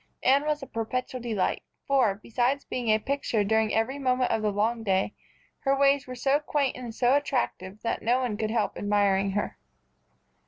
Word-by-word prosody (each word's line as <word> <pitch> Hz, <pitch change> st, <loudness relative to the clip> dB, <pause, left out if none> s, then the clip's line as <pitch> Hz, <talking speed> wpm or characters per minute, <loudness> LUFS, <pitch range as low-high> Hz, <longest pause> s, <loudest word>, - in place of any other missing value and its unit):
Anne 280 Hz, +3 st, +4 dB
was 300 Hz, -1 st, -1 dB
a -, -, -4 dB
perpetual 250 Hz, +2 st, -3 dB
delight, 220 Hz, -5 st, -1 dB, 0.2 s
for, 260 Hz, -8 st, +3 dB
besides 245 Hz, +6 st, -1 dB
being 245 Hz, -3 st, -3 dB
a 215 Hz, -, +5 dB
picture 240 Hz, -2 st, -1 dB
during 220 Hz, +1 st, +2 dB
every 255 Hz, +6 st, 0 dB
moment 255 Hz, -2 st, +1 dB
of 220 Hz, -, +1 dB
the 215 Hz, -, +1 dB
long 220 Hz, +3 st, 0 dB
day, 195 Hz, -1 st, 0 dB, 0.5 s
her 275 Hz, 0 st, +1 dB
ways 275 Hz, 0 st, +3 dB
were 255 Hz, -, -6 dB
so 270 Hz, +3 st, +2 dB
quaint 295 Hz, -2 st, 0 dB
and 240 Hz, -3 st, -7 dB
so 245 Hz, +1 st, +3 dB
attractive 240 Hz, -8 st, -2 dB
that 230 Hz, -, -1 dB
no 245 Hz, +3 st, +2 dB
one 245 Hz, -5 st, -1 dB
could 215 Hz, 0 st, -2 dB
help 225 Hz, -1 st, 0 dB
admiring 200 Hz, -1 st, +1 dB
her. 205 Hz, -, -3 dB
240 Hz, 185 wpm, -27 LUFS, 215-270 Hz, 0.5 s, a